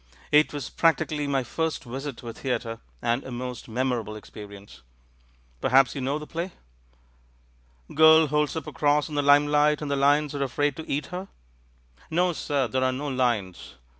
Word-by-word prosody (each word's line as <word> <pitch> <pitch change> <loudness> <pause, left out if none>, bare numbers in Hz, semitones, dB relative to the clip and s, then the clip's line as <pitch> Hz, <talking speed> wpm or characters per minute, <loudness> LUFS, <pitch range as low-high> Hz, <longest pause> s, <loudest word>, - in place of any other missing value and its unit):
It 150 +1 +5
was 145 -5 -5
practically 155 -3 +1
my 135 -2 0
first 160 +6 -2
visit 135 +1 -6
to 120 - -11
a - - -6
theatre, 115 -3 -3 0.2
and 120 +3 0
a - - -8
most 125 -1 -6
memorable 120 -2 -2
experience. 100 - -11 0.8
Perhaps 135 0 +4
you 140 - -5
know 135 +3 -1
the 150 - -7
play?" 170 +3 -5 1.4
"Girl 160 +1 +7
holds 150 +1 0
up 160 -3 -4
a - - -8
cross 150 -2 +2
in - - -8
the 145 - +1
limelight 145 +1 +4
and 150 -2 -4
the - - +2
lions 145 +1 +2
are 140 - -3
afraid 140 +1 0
to 160 - -8
eat 145 +2 -1
her?" 185 +2 -5 0.8
"No, 175 +2 +1
sir, 140 -4 -1
there 130 +3 -1
are 130 - +2
no 140 +3 -4
lions. 120 - -2
140 Hz, 175 wpm, -26 LUFS, 125-150 Hz, 1.4 s, Girl